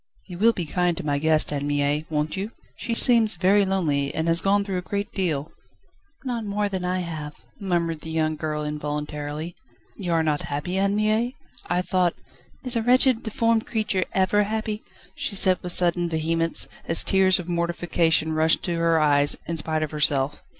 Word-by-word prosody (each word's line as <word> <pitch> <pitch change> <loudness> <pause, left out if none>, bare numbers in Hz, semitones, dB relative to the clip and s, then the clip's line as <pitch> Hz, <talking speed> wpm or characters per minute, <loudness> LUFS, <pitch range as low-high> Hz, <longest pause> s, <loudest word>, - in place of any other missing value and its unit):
"You 180 -2 -9
will 230 +3 +5
be 175 - -4
kind 175 +2 0
to - - -6
my 145 -1 0
guest, 155 0 +2
Anne 145 0 -2
Mie, 145 +1 0
won't 150 0 -1
you? 195 +3 -4 0.3
She 230 - -3
seems 230 -5 +3
very 195 +3 +3
lonely, 155 -8 0
and 160 +1 -1
has 165 +1 +4
gone 200 +1 +2
through 195 -2 -3
a - - -5
great 200 +2 -4
deal." 160 -6 -2 0.7
"Not 245 -4 -3
more 205 0 -1
than 190 -2 -4
I 180 +1 -1
have," 155 -4 -6 0.2
murmured 170 -5 -1
the 160 - -8
young 155 -1 0
girl 150 -1 -3
involuntarily. 150 +1 -4 0.4
"You 180 -4 -3
are 165 -1 +2
not 150 -2 0
happy, 150 +6 -4
Anne 200 +1 +1
Mie? 215 +4 0 0.3
I 180 +1 0
thought 180 -2 +1 0.3
..." - - -32
"Is 250 -1 +3
a 230 - +1
wretched, 250 0 +4
deformed 230 0 0
creature 215 -5 -1
ever 190 +2 +2
happy?" 215 +1 -3 0.3
she 200 - -3
said 185 -1 +4
with 180 - -2
sudden 175 -1 +3
vehemence, 165 +1 0 0.2
as 165 - +4
tears 190 -1 +3
of 180 - -6
mortification 170 -2 +1
rushed 160 +1 +2
to 175 - -2
her 165 -1 +2
eyes, 145 -1 +3
in 170 - -3
spite 155 -1 0
of 155 - -4
herself. 145 -2 +1
175 Hz, 190 wpm, -24 LUFS, 155-200 Hz, 0.7 s, will